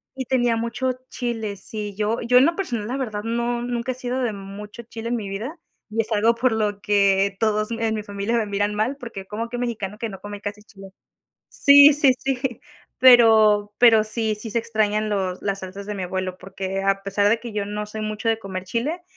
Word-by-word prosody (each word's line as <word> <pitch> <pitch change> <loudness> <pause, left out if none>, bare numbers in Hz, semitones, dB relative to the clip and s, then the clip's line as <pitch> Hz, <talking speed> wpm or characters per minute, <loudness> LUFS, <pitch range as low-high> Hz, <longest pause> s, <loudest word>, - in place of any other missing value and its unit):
Y 260 -1 -4
tenía 245 -2 +2
mucho 235 +3 -1 0.2
chile, 225 -4 -3
sí, 210 0 -5
yo 215 +2 0
yo 250 +2 +4
en 255 - +7
lo 335 +2 +1
personal, 240 - -3
la 255 +4 -3
verdad 215 -6 -4
no, 235 +1 -1
nunca 240 +1 -2
he - - -13
sido 255 0 -3
de 245 -3 0
mucho 205 +3 -9
chile 230 0 -7
en 240 - 0
mi 215 -4 -4
vida 220 - -5 0.3
y 225 +1 0
es 225 - -9
algo 225 +2 +3
por 250 +2 +1
lo 210 -2 -1
que, 200 -1 +2
todos 215 0 0
me 225 0 -1
en 220 - 0
mi 215 - -4
familia 205 +3 -2
me 225 - 0
miran 205 0 -1
mal 220 +6 0
porque, 230 -7 -8
¿cómo 225 +4 -5
que 245 - -5
mexicano 220 -5 -3
que 230 0 -4
no 195 -2 -10
come 205 0 -7
casi 205 0 -6
chile? 195 -2 -14 0.6
Sí, 285 +1 +7
sí, 280 -2 +5
sí. 265 -2 -2 0.4
Pero, 220 -4 +6
pero 230 -3 +6
sí, 220 0 -1
sí 215 +2 -7
se 235 - 0
extrañan 215 -2 0
los 190 -3 -2
las 195 -1 -2
salsas 190 +2 -8
de 210 - -4
mi 195 - -4
abuelo 185 0 -3
porque, 190 +1 -5
a 195 0 +1
pesar 200 +1 +2
de 225 +2 +3
que 235 -1 -8
yo 210 -1 -2
no 210 +1 -4
soy 215 +1 -6
mucho 215 +1 -3
de 225 -1 +2
comer 190 -3 -6
chile, 255 - -2
215 Hz, 225 wpm, -23 LUFS, 205-235 Hz, 0.6 s, en